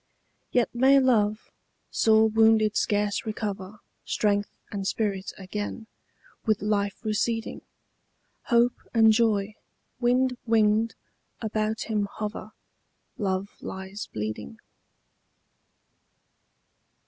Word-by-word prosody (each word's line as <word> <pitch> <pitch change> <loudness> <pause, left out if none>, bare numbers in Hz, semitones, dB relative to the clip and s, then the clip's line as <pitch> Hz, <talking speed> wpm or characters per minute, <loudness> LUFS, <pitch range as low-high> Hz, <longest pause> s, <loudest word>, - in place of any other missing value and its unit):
Yet 245 -2 +1
may 265 +3 +5
love, 215 -5 +1 0.4
sore 220 0 +4
wounded 220 -1 +4
scarce 205 +2 +1
recover 210 -2 -5 0.2
Strength 205 -1 0 0.2
and 200 -2 -3
spirit 200 -3 -1
again, 205 +3 -5 0.6
with 215 -3 +1
life 205 -1 0
receding: 225 +1 -1 0.8
Hope 240 0 +4 0.2
and 220 -1 +7
joy, 215 -2 +2 0.5
wind 250 +1 +2
winged, 220 0 +3 0.4
about 220 0 -1
him 210 -2 -1
hover: 210 0 -5 0.7
Love 195 -1 -1
lies 190 +2 -6
bleeding. 105 -9 -5
215 Hz, 90 wpm, -26 LUFS, 205-225 Hz, 0.8 s, and